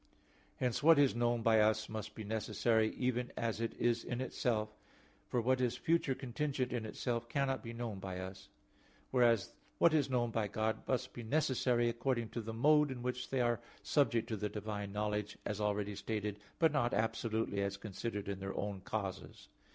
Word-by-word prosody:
Hence 125 +1 0
what 165 +1 +7
is 140 -2 +5
known 120 -1 +1
by 110 -1 +5
us 110 0 +3
must 110 -1 -6
be 110 - -6
necessary, 110 +1 +1
even 125 -1 -1
as 115 -1 -1
it 115 - -2
is 120 -1 +1
in 120 - -3
itself; 115 -4 0 0.6
for 125 - 0
what 130 +2 +2
is 125 -1 +1
future 160 -4 +2
contingent 130 0 -2
in 115 -3 -2
itself, 120 +1 -2
cannot 135 0 0
be 115 - -6
known 115 -4 -4
by 95 -1 -5
us. 95 +1 -8 0.6
Whereas 120 -5 +3 0.2
what 170 - +5
is 145 -4 +3
known 120 -2 +1
by 110 -2 0
God 110 +2 -1
must 125 -1 -1
be 120 - -6
necessary 125 -2 +2
according 120 0 0
to 120 - -4
the 115 +1 -5
mode 150 +6 +4
in 125 -2 -5
which 125 0 -3
they 130 -2 +1
are 120 -1 +2 0.2
subject 120 -6 +2
to 110 - -1
the 105 +1 -2
divine 105 -1 -4
knowledge, 105 0 -2
as 105 0 -2
already 105 0 0
stated, 105 0 -3 0.2
but 160 -2 +4
not 125 -5 +1
absolutely 110 -2 0
as 100 0 -1
considered 105 +1 -4
in 100 -1 -3
their 95 0 -4
own 100 -2 -3
causes. 100 -1 -5
115 Hz, 185 wpm, -35 LUFS, 105-125 Hz, 0.6 s, what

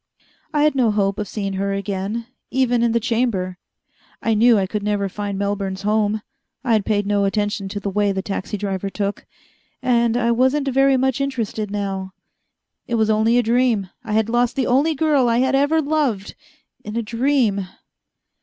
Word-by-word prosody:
I 295 -1 +2
had 305 - +4
no 255 -4 +2
hope 200 -1 0
of 210 - -3
seeing 195 0 -3
her 195 +1 -1
again, 200 +3 -3 0.2
even 250 -2 +1
in 235 -1 +2
the 235 - +2
Chamber. 220 -6 -1 0.6
I 225 - 0
knew 230 +1 +5
I 195 - +1
could 210 +2 -3
never 205 -1 0
find 200 0 -4
Melbourne's 200 -1 -2
home: 210 0 +1 0.4
I 240 -4 +1
had 215 -2 +1
paid 205 -2 +1
no 205 0 +1
attention 205 0 -1
to 205 - -4
the 200 -1 -3
way 205 0 +1
the 190 -1 -3
taxi 200 +1 -4
driver 195 -1 -3
took. 200 0 -4 0.5
And 235 -2 +2
I 235 -1 +2
wasn't 260 +4 +2
very 270 0 +4
much 265 +1 0
interested 225 -6 -2
now. 195 -2 -3 0.7
It 235 - -1
was 220 -1 +2
only 220 +2 +3
a 245 - +3
dream. 230 -4 +1
I 220 -3 -4
had 220 0 +2
lost 240 +1 +1
the 265 -3 0
only 280 +6 +2
girl 290 -5 +2
I 230 - +2
had 260 +2 +2
ever 290 +4 +3
loved, 280 -10 -1 0.5
in 210 - -7
a 235 - 0
dream. 230 -4 +1
220 Hz, 185 wpm, -21 LUFS, 200-245 Hz, 0.7 s, knew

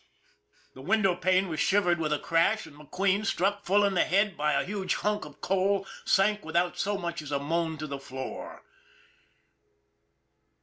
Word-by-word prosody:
" - - -36
The 130 - -12
window 195 +4 +2
pane 185 +1 +2
was 160 -3 -4
shivered 180 -4 +2
with 155 -2 -1
a 150 - +2
crash, 170 +8 +1
and 155 -3 -14
McQueen, 185 +7 -1
struck 200 0 0
full 205 +3 +3
in 200 - +1
the 180 - +3
head 200 +1 +1
by 150 0 0
a - - +1
huge 195 -1 -2
hunk 210 0 -1
of 145 - -14
coal, 195 +1 +1 0.2
sank 210 +1 +2
without 170 +2 0
so 205 0 0
much 170 -3 -4
as 150 -1 -9
a 140 - +1
moan 160 +3 -1
to 155 - -5
the 140 -2 -5
floor. 130 -1 -7
180 Hz, 180 wpm, -28 LUFS, 155-200 Hz, 0.2 s, full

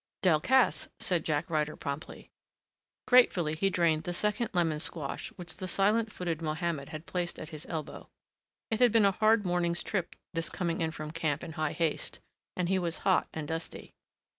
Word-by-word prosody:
"Delcassé," 190 +10 +4
said 175 -4 0
Jack 155 +2 0
Ryder 155 -3 0
promptly. 140 +1 -6 0.7
Gratefully 185 -11 +5
he 195 +5 +1
drained 170 -4 +2
the 175 - -3
second 210 +6 0
lemon 165 -5 +1
squash 150 -3 -4
which 175 -2 -7
the 185 - -4
silent 210 +4 +2
footed 170 -4 -3
Mohammed 155 -2 -2
had 155 0 -7
placed 180 -1 -3
at 155 - -7
his 155 -1 -8
elbow. 160 -3 -5 0.6
It 220 - 0
had 245 -2 +6
been 225 -2 +5
a 200 - +5
hard 215 +1 +3
morning's 175 -1 +1
trip, 185 -5 -2 0.2
this 165 -1 -1
coming 170 -2 -2
in 160 - +1
from 155 -1 -6
camp 155 -3 -1
in - - -6
high 155 -2 -1
haste, 165 -2 -2 0.4
and 180 -1 +1
he 190 +1 +2
was 170 -2 -1
hot 190 -3 +4
and 155 -2 -5
dusty. 165 +1 -5
170 Hz, 180 wpm, -30 LUFS, 155-190 Hz, 0.7 s, had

